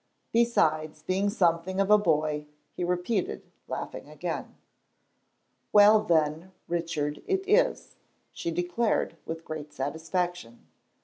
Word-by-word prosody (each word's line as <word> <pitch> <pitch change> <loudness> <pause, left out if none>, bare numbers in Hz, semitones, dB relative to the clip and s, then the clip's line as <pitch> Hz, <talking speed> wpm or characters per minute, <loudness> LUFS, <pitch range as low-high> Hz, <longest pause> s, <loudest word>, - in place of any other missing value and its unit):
"Besides 155 -10 +2
being 190 +4 +1
something 185 -2 +1
of 195 +1 +2
a 210 - +9
boy," 150 -4 0 0.3
he - - -4
repeated, 180 +4 -1 0.2
laughing - - -6
again. - - -5 1.2
"Well, 210 +1 +7
then, 165 -1 0
Richard 165 -4 -2
it 385 0 0
is," 455 +5 +2 0.3
she - - -4
declared, 175 +7 0
with 165 0 -5
great 155 -1 -6
satisfaction. 160 -1 -3
175 Hz, 110 wpm, -28 LUFS, 155-200 Hz, 1.2 s, a